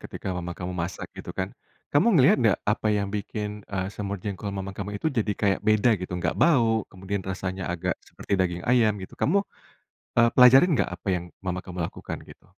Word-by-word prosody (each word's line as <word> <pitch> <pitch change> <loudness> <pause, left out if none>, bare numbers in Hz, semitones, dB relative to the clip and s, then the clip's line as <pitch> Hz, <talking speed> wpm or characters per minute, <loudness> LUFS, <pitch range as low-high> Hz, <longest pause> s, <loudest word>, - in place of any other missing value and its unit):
ketika 95 - -5
mama 90 -1 -5
kamu 90 0 -4
masak, 90 0 -4
gitu - - -8
kan. - - -2 0.4
Kamu 175 +8 +4
ngelihat 135 -1 +6
ndak, 110 -4 +4
apa 105 +1 +1
yang 100 -1 0
bikin, 105 0 -4
eee, 95 -2 -2
semur 100 -1 -4
jengkol 100 0 -4
mama 95 -1 -4
kamu 100 +1 -5
itu 155 +8 -1
jadi 110 -4 0
kayak 100 -2 +1
beda 110 +3 +4
gitu, 90 -1 -4
nggak 85 -1 0
bau, 115 - +3
kemudian 95 +1 -4
rasanya 95 0 -3
agak 90 +1 -1 0.2
seperti - - -8
daging 90 -1 0
ayam, 115 -4 +3
gitu. - - -15
Kamu, 200 +6 +3 0.7
e - - +7
pelajarin 130 +7 +7
nggak, 140 - +1
apa 90 - -13
yang 90 -1 -1 0.2
mama 90 0 -2
kamu 90 -1 -8
lakukan - - -6
gitu? - - -16
100 Hz, 195 wpm, -26 LUFS, 90-110 Hz, 0.7 s, e